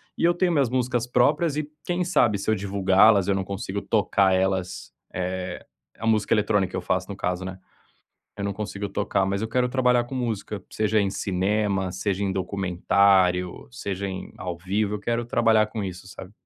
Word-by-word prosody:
e - - -4
eu 175 0 +4
tenho 180 0 +2
minhas 140 -7 +2
músicas 125 -1 0
próprias 150 +5 +2
e 155 - -2 0.2
quem 180 0 0
sabe 120 - +3
se 100 +2 -1
eu - - +4
divulgá-las 100 0 +4
eu 100 - +3
não 95 0 -1
consigo 100 +1 -4
tocar 100 -3 +2
elas, 95 -7 -1 0.2
eh, 90 0 -4 0.3
a 115 - -6
música 110 -1 +2
eletrônica 105 -3 +1
que - - -5
eu - - -3
faço, 90 +1 -1
no 100 - -5
caso, 90 -1 -2
né? 95 0 -6 0.8
Eu 100 - -4
não 100 0 -1
consigo 100 0 -4
tocar, 95 0 0
mas 100 +1 -1
eu 110 - -2
quero 125 +1 +1
trabalhar 125 -1 +2
com 120 - -10
música, 110 -4 -3
seja 110 0 +1
em 100 - +1
cinema, 95 0 0
seja 95 +2 -2
em 95 - 0
documentário, 95 -2 +1
seja 100 +9 -4
em 95 -1 -6
ao 90 -2 -4
vivo, 100 +4 -1
eu 105 - -5
quero 120 +2 -1
trabalhar 115 -3 +3
com 110 -1 -5
isso, 95 -1 -7
sabe? 95 0 -10
100 Hz, 195 wpm, -25 LUFS, 95-115 Hz, 0.8 s, eu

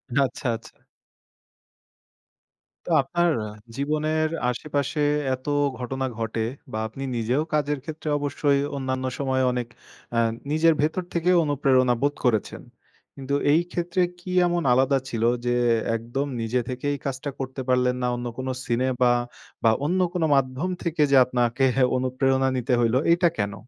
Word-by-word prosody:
আচ্ছা, 140 0 0
আচ্ছা। 115 - -11 2.1
তো - - -7
আপনার 175 +5 +1 0.5
জীবনের 155 +2 0 0.2
আশেপাশে 145 +3 -2 0.3
এত 130 +1 -6 0.3
ঘটনা 130 +2 -3
ঘটে 115 0 -2 0.3
বা 110 - -3
আপনি 135 +5 -8
নিজেও 120 +6 0
কাজের 145 -1 0
ক্ষেত্রে 155 0 -6
অবশ্যই 145 0 +1 0.2
অন্যান্য 130 -1 -2
সময়ে, 130 -1 +1
অনেক 125 -1 -2 0.5
আ - - +4 0.3
নিজের 160 +1 +4
ভেতর 160 +4 0
থেকে 170 +1 +1
অনুপ্রেরণা 130 -4 +3
বোধ 145 +1 +2
করেছেন। 110 -4 0 0.5
কিন্তু 140 +1 -2 0.2
এই 160 - +4
ক্ষেত্রে 175 +1 -1 0.2
কি 180 +1 -7 0.2
এমন 175 0 0
আলাদা 135 +2 +3
ছিল? 115 -1 -2 0.2
যে, 120 0 +1 0.4
একদম 120 +5 -3 0.2
নিজে 115 +3 0
থেকেই 145 +3 -2
কাজটা 135 +1 -3
করতে 130 0 -4
পারলেন 125 0 +2
না। 125 - +1
অন্য 120 0 -4
কোন 130 - -4 0.2
সিনে 120 +2 0
বা, 120 -1 +5 0.5
বা 115 - +6
অন্য 180 +4 +1
কোন 175 -3 0
মাধ্যম 135 +6 0
থেকে 165 -2 -1
যে 140 - +6
আপনাকে 125 +1 +1 0.3
অনুপ্রেরণা 130 +1 +1
নিতে 125 +1 0
হইলো। 120 +1 +3
এইটা 170 0 +4
কেন? 100 -1 -1
135 Hz, 140 wpm, -24 LUFS, 125-150 Hz, 2.1 s, বা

